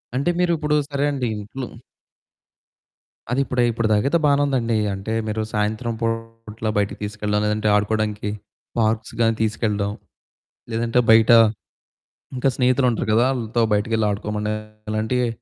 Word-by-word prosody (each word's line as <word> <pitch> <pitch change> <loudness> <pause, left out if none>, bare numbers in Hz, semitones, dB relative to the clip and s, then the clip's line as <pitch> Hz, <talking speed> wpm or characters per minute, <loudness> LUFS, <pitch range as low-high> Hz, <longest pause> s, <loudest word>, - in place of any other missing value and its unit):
అంటే 140 +6 +1
మీరిప్పుడు 160 -4 +1
సరే 140 0 0
అండి 135 -4 -2
ఇంట్లో 110 +5 -6 1.6
అది 130 - +1
ఇప్పుడై 125 -2 +1
ఇప్పుడు 115 0 -1
దాకయితే 130 +10 +3
బానే 145 -1 +4
ఉందండి. 120 -5 0 0.2
అంటే 95 +3 -4
మీరు 110 +1 -2
సాయంత్రం 110 +2 -1
పూట్ల 115 -1 -4
బయటికి 100 0 0
తీసుకెల్లడం, 105 0 -1
లేదంటే 105 0 0
ఆడుకోడానికి 105 0 0 0.5
పార్క్స్ 110 0 0
గాని 115 0 +3
తీసుకెళ్ళడం, 105 -2 0 0.8
లేదంటే 115 +2 +1
బయట 110 0 +6 1.0
ఇంకా 130 +1 +2
స్నేహితులుంటారు 125 -3 +2
గదా 115 +2 +4
ఆళ్ళతో 120 -2 -1
బయటికెళ్ళి 110 +1 +1
ఆడుకోమని 105 +1 -2 0.4
ఇలాంటివి 110 +3 0
115 Hz, 120 wpm, -22 LUFS, 105-125 Hz, 1.6 s, బయట